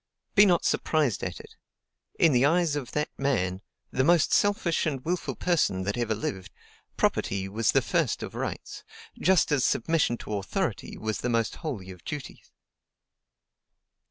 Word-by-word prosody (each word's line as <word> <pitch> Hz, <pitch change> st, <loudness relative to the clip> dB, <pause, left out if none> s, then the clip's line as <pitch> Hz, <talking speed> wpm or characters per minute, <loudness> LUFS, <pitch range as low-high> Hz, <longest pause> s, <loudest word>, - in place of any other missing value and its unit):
Be 205 Hz, -1 st, +7 dB
not 175 Hz, -3 st, +2 dB
surprised 150 Hz, -, +1 dB
at -, -, -4 dB
it: -, -, -13 dB, 0.6 s
in 165 Hz, -, +5 dB
the 125 Hz, -1 st, +3 dB
eyes 165 Hz, +1 st, +3 dB
of 140 Hz, -5 st, -5 dB
that 150 Hz, 0 st, -1 dB
man, 95 Hz, -10 st, 0 dB, 0.3 s
the 130 Hz, -, +1 dB
most 170 Hz, +2 st, +4 dB
selfish 200 Hz, -6 st, +2 dB
and 135 Hz, -4 st, -3 dB
wilful 180 Hz, +2 st, -2 dB
person 150 Hz, -, +1 dB
that 100 Hz, +3 st, -2 dB
ever 115 Hz, -2 st, -1 dB
lived, 95 Hz, -3 st, -4 dB, 0.5 s
property 95 Hz, 0 st, 0 dB
was 110 Hz, +3 st, +1 dB
the -, -, +3 dB
first -, -, 0 dB
of -, -, -6 dB
rights, -, -, -5 dB, 0.4 s
just 185 Hz, -4 st, +3 dB
as 140 Hz, -4 st, +2 dB
submission 140 Hz, -2 st, +1 dB
to 105 Hz, -, -7 dB
authority 100 Hz, 0 st, -3 dB
was 110 Hz, -1 st, -3 dB
the 125 Hz, -, -2 dB
most 115 Hz, -1 st, 0 dB
holy 110 Hz, -, -5 dB
of 90 Hz, -, -13 dB
duties. 150 Hz, -3 st, -7 dB
135 Hz, 155 wpm, -27 LUFS, 110-165 Hz, 0.6 s, Be